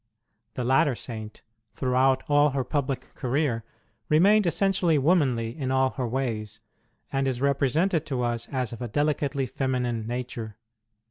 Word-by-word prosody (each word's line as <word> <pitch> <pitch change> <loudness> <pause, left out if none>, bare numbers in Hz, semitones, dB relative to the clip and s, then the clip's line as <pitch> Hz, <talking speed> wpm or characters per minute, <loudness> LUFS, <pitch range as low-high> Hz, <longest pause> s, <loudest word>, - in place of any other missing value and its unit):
The 125 - -2
latter 135 +2 +3
Saint, 110 -3 -7 0.3
throughout 130 0 +2
all 145 0 +4
her 135 -1 -1
public 135 -1 -3
career, 130 -3 -1 0.5
remained 195 +6 +5
essentially 180 -2 +2
womanly 130 -7 +2
in 135 -4 -3
all 130 0 +2
her 130 -3 -3
ways, 110 -4 -3 0.5
and 135 0 +1
is 130 -2 -1
represented 140 +5 +1
to 130 -4 -1
us 120 -1 -2
as 125 -4 -2
of 115 - -9
a 120 - -2
delicately 140 +1 0
feminine 125 -3 -2
nature. 120 -3 -5
130 Hz, 140 wpm, -26 LUFS, 120-145 Hz, 0.5 s, remained